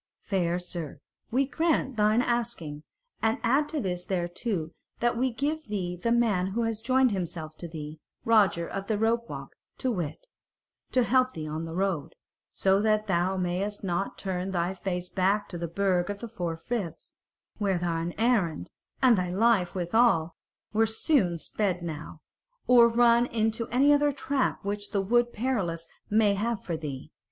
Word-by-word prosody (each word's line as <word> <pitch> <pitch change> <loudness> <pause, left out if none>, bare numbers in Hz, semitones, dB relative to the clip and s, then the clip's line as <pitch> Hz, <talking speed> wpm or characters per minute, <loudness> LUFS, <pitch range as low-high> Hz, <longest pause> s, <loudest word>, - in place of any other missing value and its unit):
"Fair 175 -3 0
sir, 175 -4 -6 0.3
we 265 +4 +2
grant 300 -3 0
thine 215 +3 +3
asking; 235 -12 -2 0.4
and 225 0 +2
add 275 +6 +2
this 185 - -2
thereto 175 -1 -2 0.3
that 240 0 +1
we 255 +2 +1
give 295 +6 -2
thee 185 -4 -2
the 205 +7 -1
man 220 -6 +2
who 225 +5 -1
has 225 -1 -2
joined 255 +1 +3
himself 170 -5 -4
to 170 - -7
thee, 155 -1 -7 0.3
Roger 200 -7 +4
of 195 0 -5
the 215 - 0
Rope 230 +2 +1
walk - - -7 0.2
to 260 - 0
wit, 175 - -4 0.7
to 255 - +3
help 255 +1 +3
thee 155 -1 -5
on 155 +2 -4
the 165 0 -6
road, 190 -5 -1 0.4
so 195 +1 +2
that 215 0 +2
thou 190 -1 +1
mayst 185 +4 -2
not 190 +1 -2
turn 185 -1 -3
thy 175 0 0
face 180 -1 -3
back 195 +3 +1
to 175 - -5
the 170 - -2
Burg 185 +1 +1
of 205 - -3
the 235 - -7
Four 175 -7 -4
Friths, 175 -3 -5 0.5
where 195 -3 +1
thine 170 0 -2
errand, 200 - +1 0.3
and 250 -3 +7
thy 180 -2 -1
life 195 -1 +2
withal, 175 -3 +2 0.4
were 220 +1 +3
soon 220 - +1
sped 180 +1 -2
now, 155 -1 -6 0.4
or 240 -1 +7
run 235 +1 +4
into 225 0 0
any 275 +4 +4
other 290 0 +3
trap 275 -5 -1
which 205 0 -3
the 200 - +2
Wood 240 +4 +2
Perilous 195 -10 -2 0.2
may 210 -1 +4
have 220 +2 -2
for 170 - -3
thee. 145 -4 -6
200 Hz, 165 wpm, -28 LUFS, 175-235 Hz, 0.7 s, and